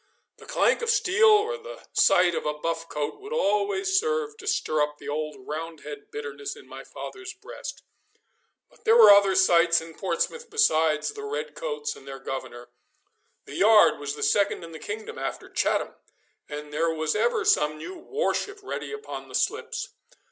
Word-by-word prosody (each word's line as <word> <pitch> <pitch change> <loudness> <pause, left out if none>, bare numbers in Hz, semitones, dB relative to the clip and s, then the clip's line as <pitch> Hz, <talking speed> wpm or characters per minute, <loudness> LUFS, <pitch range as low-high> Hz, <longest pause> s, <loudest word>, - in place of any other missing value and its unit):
The - - -15
clank - - +2
of 470 - -2
steel 445 0 +4
or 430 +3 +3
the - - -11
sight 180 -1 +5
of - - -2
a 150 0 -2
buff 165 +2 -3
coat 150 - -4
would 415 +2 -10
always 370 - +1
serve 460 -1 -2
to 425 - -11
stir 155 - +1
up 150 0 -1
the - - -11
old 150 +1 -3
Roundhead 150 -2 -7
bitterness 145 -1 -6
in - - -15
my 135 +1 -9
father's 375 - -8
breast. - - -9 0.9
But - - -24
there 450 +1 +5
were 465 - +10
other 200 -1 +6
sights 170 -3 +5
in 165 0 -10
Portsmouth 200 - -2
besides 160 - +2
the 425 -1 -8
red 460 +3 -4
coats 460 -3 -4
and 135 - -15
their 135 0 -6
Governor. 120 -3 -7 0.8
The - - -8
yard 215 -4 +6
was 145 0 -4
the - - -5
second 200 -3 +2
in 165 - -9
the 160 - -9
kingdom, 215 -5 -6
after 135 - -4
Chatham, - - 0 0.6
and 150 0 -7
there 165 +2 +1
was 160 -1 -1
ever 475 -2 +1
some 150 +1 +3
new 360 - -7
war 420 +7 -1
ship 410 0 -4
ready - - -5
upon 430 0 -7
the - - -8
slips. 480 - -1
190 Hz, 180 wpm, -26 LUFS, -, 0.9 s, were